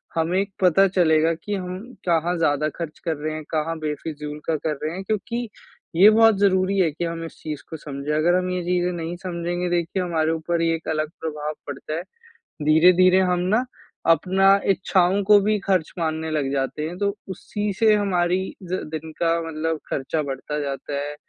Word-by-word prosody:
हमें 175 +4 +1 0.2
पता 190 +2 +5
चलेगा 165 -3 +3
कि 205 - -2
हम 180 -1 -4 0.3
कहाँ 170 +1 +2
ज़्यादा 150 -2 +1
खर्च 165 -3 -6
कर 165 -2 0
रहे 155 +1 -3
हैं, 155 0 -5
कहाँ 160 +1 -1
बेफिज़ूल 150 -1 -5
का 165 - +1
कर 150 0 -2
रहे 155 +2 -2
हैं? 190 - -5
क्योंकि 225 +3 -3 0.5
ये 195 +5 +8
बहुत 225 -1 +5
ज़रूरी 190 -1 +2
है 175 -3 +4
कि 170 +4 -4
हम 165 0 -4
इस 165 - -10
चीज़ 150 -2 -5
को 160 - -6
समझें। 145 0 -5
अगर 170 +3 +3
हम 185 0 0
ये 180 0 -1
चीज़ें 180 0 0
नहीं 170 0 -4
समझेंगे 175 0 -2
देखिए 175 +2 0
हमारे 160 -2 0
ऊपर 165 +1 -1
ये 165 0 +2
एक 165 - -9
अलग 155 -1 -1
प्रभाव 150 -1 -3
पड़ता 145 +2 -6
है, 165 - -2 0.6
धीरे-धीरे 180 +4 +6
हम 180 -1 +1
ना 240 +3 +2 0.5
अपना 195 +3 +4
इच्छाओं 190 +1 +2
को 210 +1 +7
भी 210 +1 +1
खर्च 185 -5 0
मानने 160 -1 -2
लग 145 -3 -1
जाते 135 +2 -2
हैं, 175 - -7
तो 200 0 0
उसी 205 +2 -3
से 220 -1 +6
हमारी 185 -3 +1 0.2
ज 185 +1 -3
दिन 160 0 -5
का 170 0 +2
मतलब 160 0 -2
खर्चा 150 +3 -1
बढ़ता 140 +2 -4
जाता 140 0 -4
है, 145 +1 -5
170 Hz, 190 wpm, -23 LUFS, 155-185 Hz, 0.6 s, ये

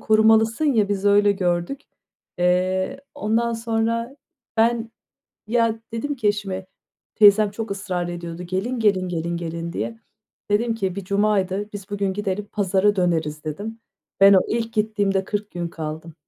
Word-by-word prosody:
korumalısın 220 +4 +4
ya, 225 -8 +3
biz 200 -1 -2
öyle 205 0 +5
gördük. 180 +6 -1 0.6
Eee, 185 +7 +1 0.2
ondan 235 -3 0
sonra 230 +2 -1 0.4
ben, 230 0 +2 0.6
ya, 230 -1 +1
dedim 290 +5 -2
ki 225 -5 0
eşime, 195 -2 -2 0.5
teyzem 210 0 +6
çok 225 0 -5
ısrar 185 -3 -3
ediyordu, 175 0 -6
"Gelin, 195 +8 -2
gelin, 195 -4 +2
gelin, 170 0 -2
gelin." 170 0 -5
diye. 225 0 -4 0.5
Dedim 230 +2 +2
ki 190 -4 -2
bir 200 - -5
cumaydı, 200 0 0
"Biz 200 -1 -8
bugün 200 -1 -1
gidelim, 205 0 -3
pazara 205 0 +2
döneriz" 160 -4 0
dedim. 210 +9 -5 0.4
Ben, 195 0 +8
o 190 - +7
ilk 230 0 -2
gittiğimde 205 -3 +1
40 205 +1 -4
gün 175 -1 -3
kaldım. 160 0 -6
205 Hz, 145 wpm, -23 LUFS, 185-225 Hz, 0.6 s, Ben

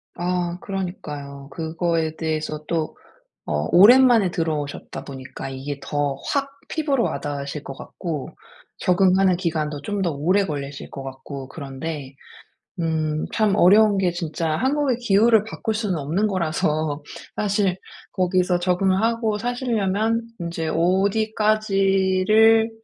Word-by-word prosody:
아 175 0 -1
그러니까요. 150 -8 -6
그거에 165 0 -1
대해서 155 -1 -3
또 160 -2 -2 0.5
어 75 +1 -1
오랜만에 230 +1 +7
들어오셨다 150 -5 -3
보니까 135 0 -7
이게 135 +2 -5
더 145 -2 -1 0.2
확 275 -1 0 0.2
피부로 285 -6 0
와 - - -2
닿으실 145 0 -5
것 135 - -6
같고 155 -1 -6 0.5
적응하는 185 0 +3
기간도 155 -5 -2
좀 205 +6 -3
더 170 - +1
오래 180 +8 +2
걸리실 140 -3 -6
것 135 - -7
같고 135 0 -8
그런데. 140 -1 -6 0.7
음 155 -2 -1
참 215 -3 +2
어려운 205 +2 +6
게 185 -2 +2
진짜 165 -2 -2
한국의 270 - +1
기후를 220 -1 +4
바꿀 220 0 -3
수는 210 -4 -1
없는 160 +9 0
거라서 155 -4 -1 0.3
사실 200 -3 +1 0.4
거기서 180 -1 +1
적응을 185 +2 +2
하고 225 -2 +1
사시려면 230 -2 0 0.2
인제 170 -1 -3
'어디까지를 200 +2 +3
180 Hz, 275 characters per minute, -23 LUFS, 155-210 Hz, 0.7 s, 오랜만에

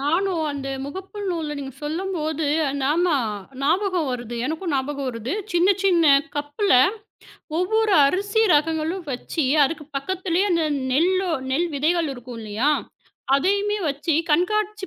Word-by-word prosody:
நானும் 335 +4 0
அந்த 275 -1 -5 0.2
முகப்பு 380 +7 -8
நூல்ல 320 -4 -2
நீங்க 270 -2 -6
சொல்லும்போது, 315 -2 -2 0.4
ஆமா. 320 +4 +2 0.5
ஞாபகம் 360 0 +1
வருது, 240 -1 -5
எனக்கும் 320 +2 -3
ஞாபகம் 275 0 -2
வருது. 235 +2 -4 0.2
சின்ன, 350 +2 +3 0.2
சின்ன 345 -4 +4 0.3
கப்புல 290 +7 0 0.9
ஒவ்வொரு 435 +4 +1
அரிசி 400 +8 +1
ரகங்களும் 320 +4 0
வெச்சி, 275 +5 -2 0.2
அதுக்கு 300 +1 -3
பக்கத்துலயே 370 +5 -1
அந்த 335 -2 +2 0.3
நெல்லோ 365 +6 +2 0.2
நெல் 335 +6 +1
விதைகள் 320 +1 +1
இருக்கும் 245 -1 -9
இல்லையா, 220 +6 0 0.6
அதையுமே 400 +7 +1
வெச்சி 290 +3 -1 0.2
கண்காட்சி 420 +4 +1
325 Hz, 120 wpm, -23 LUFS, 280-375 Hz, 0.9 s, சின்ன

